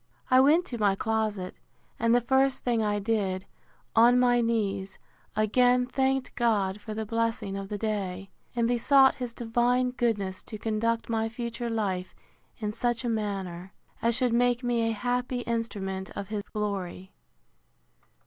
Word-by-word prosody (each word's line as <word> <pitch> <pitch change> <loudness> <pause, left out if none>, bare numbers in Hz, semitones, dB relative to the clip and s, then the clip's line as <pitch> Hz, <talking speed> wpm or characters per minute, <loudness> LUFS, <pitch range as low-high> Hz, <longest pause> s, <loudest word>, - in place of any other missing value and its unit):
I 255 - +7
went 305 +7 +5
to 240 - -6
my 200 -2 +3
closet; 215 -3 -2 0.4
and 230 +1 +3
the 245 - +4
first 265 +2 +2
thing 235 -2 +1
I 210 -1 +1
did, 200 -3 -1 0.5
on 240 +2 +6
my 245 -1 +4
knees, 205 -4 -1 0.4
again 245 +4 +3
thanked 265 +1 0
God 210 -4 +1
for 215 -1 -6
the 220 0 -3
blessing 225 -3 -1
of 195 0 -5
the 210 - -3
day; 195 -3 -3 0.2
and 235 -1 +2
besought 265 +3 +4
his 245 -2 -3
divine 240 +2 +1
goodness 205 -7 -1
to 215 - -8
conduct 225 +2 -1
my 225 -1 0
future 235 0 -4
life 195 -5 -2 0.4
in 210 -1 -3
such 240 +2 -1
a - - 0
manner, 195 -4 -3 0.3
as 230 0 +2
should 250 -2 +1
make 245 +1 +2
me 235 -2 +1
a - - 0
happy 245 +3 -1
instrument 200 -5 -3
of 200 - -5
his 210 -2 -4
glory. 195 -3 -4
225 Hz, 155 wpm, -28 LUFS, 205-245 Hz, 0.5 s, I